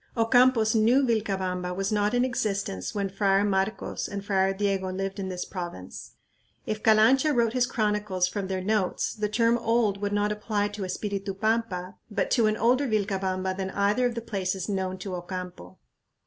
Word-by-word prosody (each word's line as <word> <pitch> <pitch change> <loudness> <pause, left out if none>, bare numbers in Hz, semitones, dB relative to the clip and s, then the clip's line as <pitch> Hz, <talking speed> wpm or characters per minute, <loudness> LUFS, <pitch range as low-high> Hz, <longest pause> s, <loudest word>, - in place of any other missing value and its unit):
Ocampo's 230 -1 +4
new 235 +5 +4
"Vilcabamba" 190 -6 -1
was 195 +2 -2
not 210 +2 +1
in 245 +1 +3
existence 200 - -2
when 200 -1 0
Friar 195 0 +2
Marcos 195 +1 -1
and 200 0 -6
Friar 195 -1 +2
Diego 195 -1 -1
lived 195 +1 -4
in 190 -1 -3
this 180 -1 -4
province. 175 - -7 0.5
If 215 0 -3
Calancha 225 +8 +5
wrote 230 -2 +2
his 250 -1 +2
chronicles 210 -6 0
from 200 -1 -4
their 190 -1 -3
notes, 205 -2 0
the 210 -1 -2
term 230 +2 +2
"old" 225 -3 +1
would 205 0 -1
not 205 0 +1
apply 210 -1 -1
to 205 -1 -5
Espiritu 195 +1 -3
Pampa, 215 -4 -1
but 210 - -1
to 230 -4 +4
an 215 0 0
older 250 +6 +2
Vilcabamba 190 -3 -1
than 190 0 -3
either 205 +6 +1
of 240 - -4
the 230 - -3
places 190 -4 -2
known 190 -2 -2
to 190 0 -6
Ocampo. 175 - -7
205 Hz, 175 wpm, -27 LUFS, 190-220 Hz, 0.5 s, Calancha